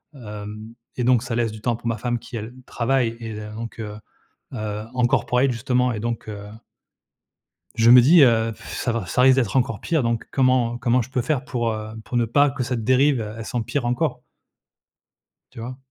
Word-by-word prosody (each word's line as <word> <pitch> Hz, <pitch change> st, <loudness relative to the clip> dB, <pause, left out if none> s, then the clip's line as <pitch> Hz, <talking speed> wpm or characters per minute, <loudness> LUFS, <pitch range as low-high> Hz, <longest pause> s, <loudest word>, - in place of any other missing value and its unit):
heu, -, -, -12 dB
hem 105 Hz, 0 st, -8 dB, 0.2 s
et 125 Hz, -, 0 dB
donc 125 Hz, -2 st, +4 dB
ça 120 Hz, -2 st, -3 dB
laisse 115 Hz, -2 st, 0 dB
du 110 Hz, 0 st, -10 dB
temps 120 Hz, +1 st, 0 dB
pour 120 Hz, -, -7 dB
ma 115 Hz, 0 st, -1 dB
femme 120 Hz, +2 st, -1 dB
qui, 120 Hz, -, -10 dB
elle, 110 Hz, +2 st, -7 dB
travaille 120 Hz, -1 st, 0 dB
et 115 Hz, -1 st, -6 dB
heu, 105 Hz, 0 st, -8 dB
donc, 115 Hz, +1 st, -7 dB
heu 105 Hz, -1 st, -5 dB, 0.6 s
heu, 105 Hz, -2 st, -4 dB
en 125 Hz, -1 st, +1 dB
corporate 125 Hz, +2 st, +2 dB
justement 125 Hz, +1 st, 0 dB
et 105 Hz, -, -4 dB
donc, 115 Hz, 0 st, -4 dB
heu 105 Hz, -1 st, -7 dB, 1.3 s
Je 115 Hz, +1 st, +3 dB
me 125 Hz, 0 st, +9 dB
dis, 160 Hz, +7 st, +6 dB
heu, 115 Hz, -3 st, +4 dB
pff, -, -, -9 dB
ça 120 Hz, -, -1 dB
va 115 Hz, -5 st, -3 dB
ça 125 Hz, +8 st, +1 dB
risque 130 Hz, 0 st, +6 dB
d'être 120 Hz, -6 st, 0 dB
encore 115 Hz, -5 st, 0 dB
pire 160 Hz, -4 st, 0 dB
donc 115 Hz, -1 st, -1 dB
comment 130 Hz, -3 st, +2 dB
comment 125 Hz, 0 st, +2 dB
je 120 Hz, -, -4 dB
peux 130 Hz, -1 st, -1 dB
faire 130 Hz, +1 st, -1 dB
pour, 120 Hz, -4 st, -2 dB
heu, 110 Hz, 0 st, -6 dB
pour 120 Hz, -, -2 dB
ne 120 Hz, -, +1 dB
pas 140 Hz, +5 st, +3 dB
que 140 Hz, -1 st, -4 dB
cette 120 Hz, -2 st, -3 dB
dérive, 130 Hz, +1 st, +3 dB
e 105 Hz, 0 st, -6 dB
elle 115 Hz, -, -6 dB
s'empire 120 Hz, +2 st, -2 dB
encore? 120 Hz, 0 st, -1 dB, 1.3 s
Tu -, -, -10 dB
vois? 125 Hz, +3 st, -6 dB
120 Hz, 215 wpm, -23 LUFS, 110-125 Hz, 1.3 s, me